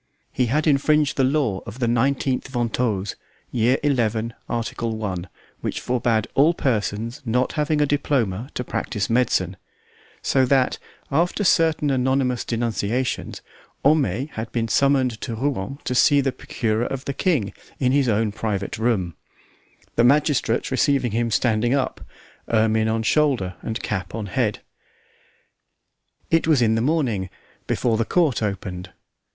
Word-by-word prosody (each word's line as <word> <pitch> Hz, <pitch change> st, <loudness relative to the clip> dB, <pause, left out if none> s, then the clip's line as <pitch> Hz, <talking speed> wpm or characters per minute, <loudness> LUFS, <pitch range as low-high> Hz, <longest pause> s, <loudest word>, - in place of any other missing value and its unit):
He 125 Hz, -1 st, 0 dB
had 150 Hz, +6 st, +1 dB
infringed 150 Hz, 0 st, +3 dB
the 135 Hz, -, +2 dB
law 130 Hz, -8 st, +1 dB
of 110 Hz, -, -8 dB
the 130 Hz, -, 0 dB
19th 130 Hz, +3 st, +1 dB
Ventose, 115 Hz, -5 st, -1 dB, 0.4 s
year 120 Hz, +2 st, +2 dB
xi., 115 Hz, -5 st, +1 dB, 0.2 s
article 115 Hz, -1 st, -3 dB
I, 95 Hz, -3 st, -2 dB, 0.4 s
which -, -, -3 dB
forbade 115 Hz, -3 st, 0 dB
all 155 Hz, +5 st, +4 dB
persons 115 Hz, -, -1 dB
not 125 Hz, +1 st, 0 dB
having 150 Hz, 0 st, +1 dB
a -, -, +4 dB
diploma 130 Hz, -6 st, 0 dB
to 125 Hz, -, -2 dB
practise 105 Hz, -3 st, -3 dB
medicine; 100 Hz, -7 st, +1 dB, 0.7 s
so 135 Hz, -, +3 dB
that, 130 Hz, -1 st, +2 dB, 0.3 s
after 170 Hz, +8 st, +1 dB
certain 160 Hz, -5 st, +3 dB
anonymous 130 Hz, -1 st, +1 dB
denunciations, 115 Hz, +1 st, -2 dB, 0.4 s
Homais 140 Hz, -, +2 dB
had 110 Hz, +1 st, -5 dB
been 115 Hz, -1 st, -1 dB
summoned 130 Hz, 0 st, +2 dB
to 115 Hz, -4 st, -4 dB
Rouen 130 Hz, -1 st, -2 dB
to 125 Hz, -, -2 dB
see 140 Hz, +3 st, +5 dB
the 135 Hz, -1 st, +1 dB
procurer 115 Hz, -2 st, -2 dB
of 135 Hz, 0 st, -5 dB
the 140 Hz, -, -2 dB
king 135 Hz, -, 0 dB, 0.3 s
in 125 Hz, -2 st, +2 dB
his 135 Hz, -2 st, +3 dB
own 110 Hz, 0 st, +1 dB
private 100 Hz, -2 st, -3 dB
room; 105 Hz, -7 st, 0 dB, 0.8 s
the 115 Hz, -, +5 dB
magistrate 135 Hz, -3 st, +2 dB
receiving 135 Hz, -2 st, +2 dB
him 115 Hz, +2 st, 0 dB
standing 120 Hz, +2 st, +2 dB
up, 135 Hz, -, -2 dB, 0.5 s
ermine 110 Hz, 0 st, +3 dB
on 110 Hz, 0 st, 0 dB
shoulder 125 Hz, -8 st, +2 dB
and 110 Hz, -1 st, -4 dB
cap 100 Hz, -1 st, -3 dB
on 110 Hz, -2 st, -3 dB
head. 105 Hz, +2 st, -1 dB, 1.7 s
It 165 Hz, -1 st, +3 dB
was 155 Hz, -5 st, +4 dB
in 110 Hz, -2 st, +3 dB
the 115 Hz, -, +1 dB
morning, 120 Hz, -, 0 dB, 0.4 s
before 115 Hz, -3 st, +1 dB
the 115 Hz, -, +2 dB
court 155 Hz, -8 st, +1 dB
opened. 95 Hz, -3 st, -4 dB
120 Hz, 145 wpm, -23 LUFS, 110-140 Hz, 1.7 s, see